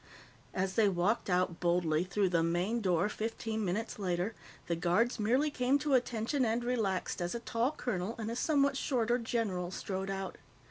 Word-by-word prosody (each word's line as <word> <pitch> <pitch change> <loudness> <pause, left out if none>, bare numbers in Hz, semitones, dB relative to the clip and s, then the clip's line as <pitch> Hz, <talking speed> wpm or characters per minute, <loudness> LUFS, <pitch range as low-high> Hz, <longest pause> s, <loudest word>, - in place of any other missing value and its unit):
As 190 0 0
they 215 -2 +4
walked 195 +5 0
out 180 -1 +1
boldly 170 -2 +2
through 190 +1 +1
the 170 -2 +2
main 175 +8 0
door, 180 -1 +2
fifteen 220 0 -3
minutes 210 +4 -2
later, 185 +2 -1 0.3
the 170 - 0
guards 180 +9 +1
merely 255 +8 +2
came 255 0 +2
to 290 0 -1
attention 245 +2 +1
and 230 +1 +1
relaxed 220 -8 -1
as 175 +5 -2
a - - -2
tall 235 +3 0
colonel 220 -5 -2
and 225 0 -3
a - - -3
somewhat 280 +1 +2
shorter 245 -3 +1
general 215 -7 -1
strode 190 +1 -4
out. 195 -1 -4
215 Hz, 175 wpm, -32 LUFS, 180-240 Hz, 0.3 s, they